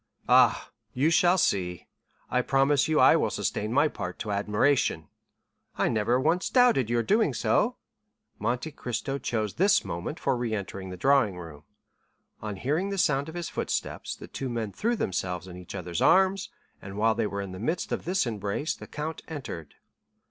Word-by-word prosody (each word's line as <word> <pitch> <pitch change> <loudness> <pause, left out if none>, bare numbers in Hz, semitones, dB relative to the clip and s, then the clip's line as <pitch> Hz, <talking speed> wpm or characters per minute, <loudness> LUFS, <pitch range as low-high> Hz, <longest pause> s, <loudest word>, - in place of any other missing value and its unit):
"Ah, - - +4 0.2
you 145 +6 +2
shall 175 +1 +4
see; 90 - 0 0.5
I 125 - +3
promise 135 +2 +2
you 155 -1 +2
I - - +7
will - - +1
sustain 105 +1 -2
my 145 +5 +4
part 90 -10 -6
to 105 - -4
admiration." 105 - +1 0.7
"I - - +2
never 120 +2 +1
once 165 +7 +1
doubted 245 - +4
your 120 0 +1
doing 215 - +2
so." 245 +3 +1 0.6
Monte 125 +8 -2
Cristo 135 +1 -4
chose 110 -6 -2
this 200 +4 +3
moment 85 - -5
for - - +1
re 120 -2 -2
entering 95 -1 -6
the 90 - -7
drawing 125 -4 +3
room. 80 -4 -10 0.8
On 105 -2 -4
hearing 150 - -1
the 200 - -3
sound 150 -4 +1
of 160 - -9
his 175 -2 -4
footsteps, - - -3
the - - -11
two 135 - -5
men 115 -3 -3
threw 235 - 0
themselves 90 - -2
in 90 - -9
each 90 -1 -9
other's 85 -1 -4
arms, 190 0 +4 0.3
and 95 0 -8
while 110 +1 +3
they 110 -1 -1
were 100 -1 -4
in 95 - -7
the 95 - -8
midst 160 - -2
of - - -2
this 180 -2 +1
embrace, 105 - -2
the - - -11
count 155 +2 -5
entered. 135 - -7
120 Hz, 180 wpm, -27 LUFS, 100-155 Hz, 0.8 s, I